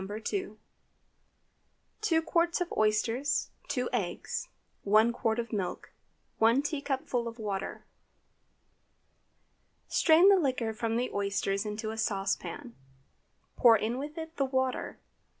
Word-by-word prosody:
2). 215 - -4 1.4
2 330 -7 +2
qts. 335 +1 +1
of 355 -1 -2
oysters. 225 +6 +1 0.2
2 - - -1
eggs. - - -2 0.3
1 215 +3 +4
qt. 225 -2 0
of 235 -1 -4
milk. 190 -4 -4 0.5
1 230 +5 +4
teacupful 270 -5 -2
of 230 0 -7
water. 200 -4 -4 2.0
Strain 330 +3 +5
the 400 - +7
liquor 255 -7 0
from 225 +1 -2
the 250 +1 -1
oysters 200 0 -1
into 215 +1 -4
a 220 - -6
saucepan, 220 +4 -2 0.8
pour 230 -3 +7
in 230 +4 -2
with 295 +3 -6
it 320 +1 -7
the 275 - +2
water. 260 -1 -1
235 Hz, 115 wpm, -30 LUFS, 215-285 Hz, 2.0 s, the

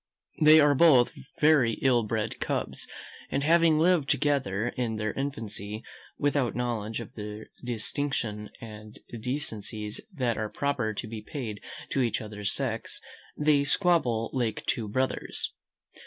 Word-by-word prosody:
They 155 +1 +9
are 145 -1 +6
both 135 -5 +6 0.3
very 150 -7 +5
ill 125 0 +3
bred 110 0 -2
cubs; - - -3 0.4
and 140 - 0
having 165 0 +5
lived 165 -3 +3
together 120 -6 +1
from 120 -3 -1
their 110 0 -2
infancy, 110 -6 -4 0.3
without 145 -4 +1
knowledge 115 -3 -2
of 115 - -8
the 105 -1 -7 0.2
distinctions 120 -2 -2
and 110 -1 -10 0.2
decencies 110 -5 -3
that 125 - -1
are 110 -1 -2
proper 125 -6 -1
to 115 - -4
be 110 0 -6
paid 110 -5 -6 0.3
to 135 - +1
each 120 -3 +1
other's 105 -2 -4
sex, 120 -5 -3 0.4
they 150 -1 +4
squabble 140 - +2
like 120 -5 -1
two 110 -3 0
brothers. 130 +5 -1
120 Hz, 135 wpm, -28 LUFS, 110-140 Hz, 0.4 s, They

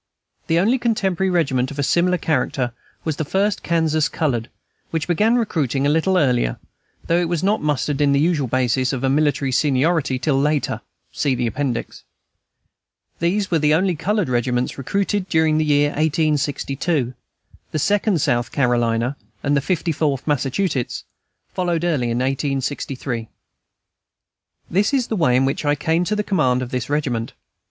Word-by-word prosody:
The 165 - +2
only 225 +9 +3
contemporary 195 -5 0
regiment 135 -8 +1
of 145 - -9
a 140 - 0
similar 180 +5 +2
character 130 -5 -1 0.3
was 155 -2 -2
the - - -1
"First 195 +6 0
Kansas 160 -3 +1
Colored," 130 -7 -1 0.4
which 160 -2 -2
began 210 +7 +3
recruiting 145 - 0
a 145 - +3
little 170 +4 +2
earlier, 125 - +1 0.5
though 170 +1 +2
it 170 - -1
was 170 -1 -1
not 205 +3 +2
mustered 150 -1 -1
in 145 -1 +4
the 140 - +3
usual 155 -3 +1
basis 130 +1 +1
of 130 -1 -3
military 140 0 +1
seniority 140 +1 +1
till 135 0 +1
later. 150 0 0 0.3
[See 130 -3 0
Appendix] 120 +1 -3 1.2
These 185 +4 0
were 165 - +3
the 150 0 +3
only 185 +1 +1
colored 205 +4 0
regiments 125 0 0
recruited 195 +6 -1
during 160 -1 +3
the 155 - +1
year 145 -1 +3
1862. 145 -2 0 0.6
The - - -3
Second 205 +3 +1
South 120 -2 0
Carolina 120 0 +1 0.3
and 145 0 +2
the 140 - +2
Fifty 175 +1 -1
Fourth 145 -3 -1
Massachusetts 145 0 -1 0.5
followed 175 -2 -1
early 145 -9 0
in 115 - -1
1863. 135 -3 -2 1.4
This 205 +10 +1
is 255 -3 0
the 220 - 0
way 155 -10 +3
in 130 +1 +3
which 135 - -1
I 145 0 +2
came 160 +4 +1
to 210 - 0
the 210 - 0
command 130 -11 +1
of 125 - -7
this 125 0 -3
regiment. 130 -6 -1
150 Hz, 160 wpm, -21 LUFS, 130-175 Hz, 1.4 s, in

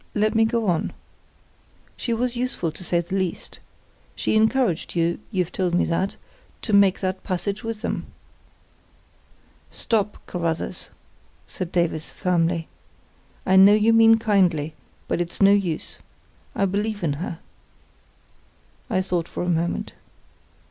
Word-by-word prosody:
let 215 0 +2
me 225 0 +4
go 230 0 0
on. 175 -5 0 1.0
She 240 - -4
was 240 +2 0
useful, 240 -9 -2
to 170 - -10
say 175 -1 +1
the 170 +2 -9
least. 185 -3 -3 0.6
She - - 0
encouraged 220 -6 +1
you—you've 175 +2 -1
told 180 -2 0
me - - +3
that—to 190 +4 -5
make 200 -2 +5
that 185 0 -2
passage 200 +4 -3
with 225 -1 -5
them." - - -3 1.6
"Stop, 210 -2 -1
Carruthers," 170 -2 -3 0.6
said 180 -2 -6
Davies, 170 -3 0
firmly. 170 -2 0 0.8
"I 190 - +3
know 195 +2 +8
you 215 +2 +4
mean 225 0 +7
kindly; 180 -9 +2 0.3
but - - 0
it's 175 - -4
no 195 0 +6
use. 190 -6 -1 0.6
I 200 - +2
believe 205 +1 -2
in 150 -4 +1
her." 170 - -4 1.5
I 185 - +1
thought 175 -3 -1
for - - -4
a 180 - -1
moment. 170 0 -1
190 Hz, 130 wpm, -23 LUFS, 170-215 Hz, 1.6 s, know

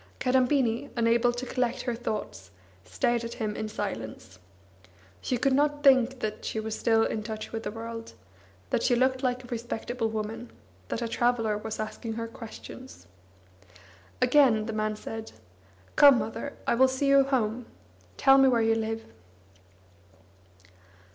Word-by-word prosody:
Kadambini, 255 0 +1
unable 235 0 +3
to 245 +1 -5
collect 250 -1 -1
her 245 - -1
thoughts, 215 - -5 0.4
stared 235 - 0
at 230 0 -6
him 215 -2 -3
in 215 - -4
silence. 110 - -6 0.8
She 250 - -1
could 265 +3 +2
not 290 +1 +1
think 260 -2 +4
that 215 0 -4
she 220 - -3
was 220 0 -3
still 225 -1 +2
in 220 - -2
touch 215 0 -6
with 225 - -4
the 205 - -4
world, 230 +1 -7 0.6
that - - +1
she 245 - +3
looked 260 +1 +2
like 255 -1 -1
a - - -12
respectable 235 0 -3
woman, 220 +2 -5 0.4
that 235 - -3
a - - -1
traveller 230 -2 +1
was 215 +1 -5
asking 215 +1 -4
her 230 +1 -4
questions. 230 +3 -11 1.2
Again 245 -8 +4
the 225 - -4
min 215 0 -1
said: 220 +1 -7 0.6
"Come, 280 -3 +8
mother, 240 +5 -4
I - - +2
will 260 +3 +5
see 260 +2 -1
you 275 0 +6
home. 245 -3 -1 0.5
Tell 270 0 +6
me 270 - +6
where 240 -3 +3
you 225 0 +3
live." 225 0 -3
230 Hz, 155 wpm, -28 LUFS, 220-255 Hz, 1.2 s, Come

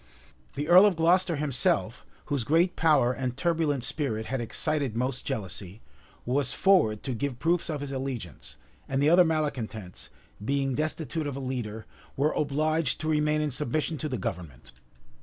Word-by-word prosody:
The 145 +1 -3
earl 180 +4 +8
of 200 - +1
Glocester 175 +2 +3
himself, 140 -3 0 0.2
whose 140 -5 -1
great 165 +8 +2
power 145 -6 +3
and 125 -1 -3
turbulent 160 -6 0
spirit 115 -8 -2
had 135 +1 -2
excited 135 +1 -1
most 125 +2 -2
jealousy, 100 -5 -5 0.5
was 130 +1 0
forward 160 - +3
to 130 - -3
give 130 +2 -3
proofs 170 +6 0
of 150 -3 -3
his 145 -1 -5
allegiance; 130 - -6 0.3
and 135 - 0
the 145 +3 +4
other 180 +1 +7
malecontents, 125 - -3 0.3
being 135 +2 0
destitute 155 +2 -2
of 140 - -4
a - - -4
leader, 120 -5 -4 0.3
were 145 +3 +2
obliged 155 0 0
to 155 - -2
remain 150 0 +2
in 150 -1 -1
submission 150 +5 -2
to 155 - -3
the 130 - -2
government. 85 - -6
140 Hz, 160 wpm, -27 LUFS, 120-155 Hz, 0.5 s, earl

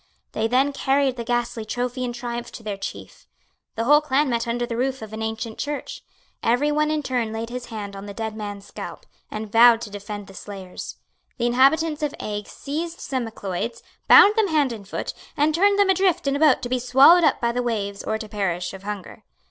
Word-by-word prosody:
They 220 - 0
then 265 +4 +2
carried 275 -1 +1
the 235 - -4
ghastly 240 -1 -1
trophy 245 +3 -3
in 245 - -2
triumph 240 0 -5
to 225 - -9
their 210 -2 -3
chief. 195 - -8 0.5
The 225 - -1
whole 295 +5 +6
clan 285 -1 +1
met 235 0 -1
under 240 +1 -1
the 235 -1 -4
roof 260 0 -1
of 220 0 -9
an 220 - -5
ancient 220 0 -4
church. 290 0 -4 0.4
Every 245 +6 +2
one 300 +1 +1
in 305 -1 -1
turn 245 -4 -1
laid 225 +1 -5
his 250 0 -6
hand 205 -3 -6
on 195 +1 -8
the 200 - -7
dead 220 -1 -4
man's 205 -2 -6
scalp, - - -8 0.2
and 215 -1 -6
vowed 230 0 +7
to 220 -3 -7
defend 205 0 -7
the 195 - -14
slayers. 190 -2 -8 0.4
The 240 - -1
inhabitants 295 +6 +3
of 300 0 -2
Eigg 210 -1 -4
seized 330 +4 -5
some 260 -3 -2
Macleods, 220 +2 -5 0.2
bound 415 - +8
them 435 -2 +4
hand 295 -7 +2
and 205 -4 -10
foot, - - -4 0.2
and 300 +2 +3
turned 400 +5 +4
them 400 -1 +4
adrift 375 -4 +2
in 275 0 +1
a - - -1
boat 300 -5 +4
to 245 - -3
be 255 0 +1
swallowed 270 +8 +6
up 310 - +3
by 235 -1 +1
the 245 +1 -1
waves 205 -4 -3
or 220 - -1
to 220 - -7
perish 185 -4 -2
of 190 - -9
hunger. 205 -2 -7
240 Hz, 220 wpm, -23 LUFS, 215-280 Hz, 0.5 s, bound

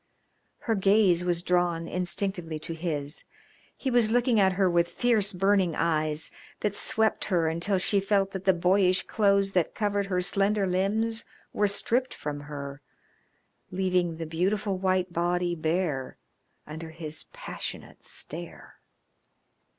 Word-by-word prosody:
Her 230 - 0
gaze 195 -3 +3
was 175 -1 0
drawn 175 -2 +1
instinctively 180 -2 -2
to 160 +2 -6
his. 155 -3 -4 0.5
He 265 - -2
was 240 -3 +4
looking 240 -1 +3
at 190 -1 +4
her 190 0 +2
with 170 -1 +2
fierce 215 +2 +1
burning 190 -2 +2
eyes 155 -2 0 0.3
that 210 -2 0
swept 220 +1 +1
her 175 -5 +1
until 170 +5 0
she 200 +2 +2
felt 195 0 +1
that 190 0 -6
the 190 - +5
boyish 185 +1 +3
clothes 200 -2 +2
that 180 -4 0
covered 205 -2 0
her 185 -2 0
slender 195 +2 +2
limbs 210 +5 0 0.3
were 205 - +2
stripped 240 +5 +1
from 145 -1 -5
her, 145 -1 -7 0.9
leaving 180 -3 0
the 165 - -4
beautiful 190 +5 0
white 185 -1 0
body 175 +1 0
bare 155 -4 -2 0.5
under 160 +2 -7
his 160 -1 -6
passionate - - -7
stare. - - -8
185 Hz, 135 wpm, -27 LUFS, 170-200 Hz, 0.9 s, the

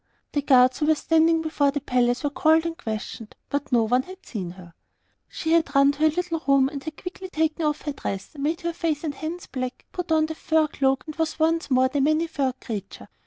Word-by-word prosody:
The 290 - 0
guards 255 -2 +5
who 300 - +1
were 315 - +5
standing 325 +2 +3
before 300 -3 +1
the 285 +1 -1
palace 245 -2 +1
were 290 - 0
called 320 +2 +3
and 335 0 -2
questioned, 220 -6 -6 0.2
but 285 0 -2
no 235 -2 +4
one 245 +3 +2
had 370 +6 -13
seen 190 -7 -5
her. 175 -1 -12 0.5
She 320 - -3
had 330 -3 +2
run 275 0 +6
to 285 - -11
her 315 0 +5
little 335 0 -2
room 275 -1 +4
and 280 -1 -7
had 315 -1 -7
quickly 370 +1 -7
taken 320 -1 0
off 300 -1 -1
her 295 - -3
dress, 195 -7 -5
made 305 +5 -2
her 340 -1 -2
face 320 -3 -2
and 305 -3 -2
hands 325 +4 -6
black, 255 -1 -5
put 360 -2 -5
on 315 -1 +4
the 320 - -4
fur 315 0 +2
cloak, 270 -1 +1
and 310 -2 -7
was 320 -1 -1
once 325 0 +1
more 260 -1 +4
the 275 +2 -1
Many 310 +3 +2
furred 265 -5 -2
Creature. 205 -5 -7
300 Hz, 230 wpm, -24 LUFS, 260-320 Hz, 0.5 s, run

